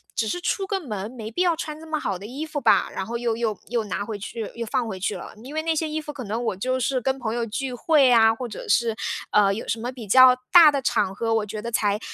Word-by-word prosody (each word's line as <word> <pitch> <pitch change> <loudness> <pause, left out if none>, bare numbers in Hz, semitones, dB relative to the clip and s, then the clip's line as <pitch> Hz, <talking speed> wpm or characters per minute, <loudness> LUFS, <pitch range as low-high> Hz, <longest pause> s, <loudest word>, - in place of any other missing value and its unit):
只 220 - 0
是 355 - -2
出 390 +2 -1
个 390 -1 -1
门， 210 - -5
没 220 -4 -7
必 355 - -2
要 345 -2 +2
穿 310 -1 -6
这 320 - -11
么 310 -1 -2
好 195 -2 -2
的 200 - -9
衣 275 +6 -5
服 305 -2 -4
吧。 - - +4
然 190 - -3
后 235 +1 -4
又 235 -2 0
又 225 -3 -1
又 235 -2 0
拿 200 +1 -3
回 215 -2 -5
去， 220 +1 -6
又 235 - -4
放 230 +2 -1
回 190 -3 -5
去 200 - -2
了。 - - -9
因 275 +4 -9
为 315 - 0
那 325 -1 0
些 315 0 -1
衣 310 +1 -2
服 295 - -7
可 260 - -7
能 225 +4 -3
我 195 - -1
就 255 +6 -1
是 255 +1 0
跟 265 +2 0
朋 225 -2 -3
友 235 - -1
聚 260 +4 -3
会 280 +2 +4
呀， 225 -2 +6
或 250 +1 -5
者 460 - -8
是， 230 - +2 0.4
呃， 200 -1 +4
有 220 - -6
什 225 - -1
么 245 +3 -4
比 235 -5 -10
较 255 +4 +8 0.2
大 335 -4 +9
的 280 - -1
场 225 -6 +1
合， 225 +1 -2
我 220 - +1
觉 210 +1 -6
得 235 +1 -5
才 210 -2 +1
240 Hz, 310 characters per minute, -24 LUFS, 220-285 Hz, 0.4 s, 大